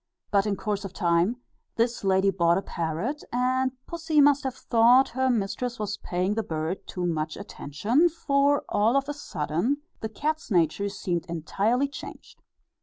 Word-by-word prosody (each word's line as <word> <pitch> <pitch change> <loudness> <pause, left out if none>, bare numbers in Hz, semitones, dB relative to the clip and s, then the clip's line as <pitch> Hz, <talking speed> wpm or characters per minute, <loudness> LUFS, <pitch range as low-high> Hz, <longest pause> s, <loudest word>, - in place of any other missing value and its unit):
But 200 0 +3
in 205 - 0
course 205 0 -3
of 195 -1 -7
time, 175 +4 +2 0.4
this 230 0 0
lady 195 0 +3
bought 170 -2 +3
a 195 - -2
parrot, 175 - -3
and 255 +1 +1
pussy 325 -3 0
must 285 -1 +5
have 260 -2 -2
thought 245 +2 +4
her 260 +2 0
mistress 235 +2 -1
was 210 -1 -3
paying 180 +3 -1
the 225 - 0
bird 160 -1 -4
too 180 -1 -3
much 155 -2 -2
attention, 230 - 0
for 285 -3 +1
all 220 +5 +3
of 275 0 0
a 290 - -2
sudden 220 - -2 0.2
the 220 - -4
cat's 305 +8 -3
nature 180 +1 +1
seemed 175 -3 -3
entirely 200 - 0
changed. 280 - -11
215 Hz, 165 wpm, -26 LUFS, 180-260 Hz, 0.4 s, must